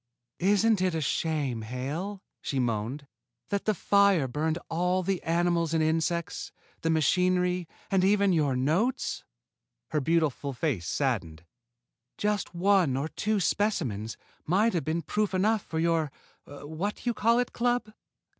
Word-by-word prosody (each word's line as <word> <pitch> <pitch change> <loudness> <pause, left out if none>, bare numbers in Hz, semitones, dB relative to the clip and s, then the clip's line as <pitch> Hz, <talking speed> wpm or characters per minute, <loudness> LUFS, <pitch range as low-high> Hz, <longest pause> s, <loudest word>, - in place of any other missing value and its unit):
"Isn't 205 +2 +3
it 185 -3 +1
a - - 0
shame, 145 -4 -1
Hale," 145 - -4 0.2
she 140 - -3
moaned, 120 +3 -1 0.4
"that 200 -1 -1
the 215 - +2
fire 200 -6 +3
burned 155 +5 -1
all 180 +3 0
the 190 -1 -1
animals 170 -1 +1
and 160 - +3
insects, 165 +1 -1 0.3
the 165 - 0
machinery, 180 +3 +2 0.2
and 190 -1 +3
even 200 0 +4
your 145 -5 +2
notes?" 175 - 0 0.7
Her 155 -2 +1
beautiful 150 -2 0
face 120 - -2
saddened. 90 - -2 0.7
"Just 205 -3 -1
one 180 -7 +3
or 145 +4 -2
two 215 +3 -1
specimens 145 - -1 0.3
might 205 +7 +3
have 170 -6 -1
been 160 +1 -1
proof 210 +3 -1
enough 210 +3 +2
for 160 - -6
your 165 -2 +1 0.4
What 160 - -5
You 240 - +1
Call 230 +2 +3
It 245 0 0
Club!" 240 -2 0
170 Hz, 140 wpm, -28 LUFS, 145-200 Hz, 0.7 s, even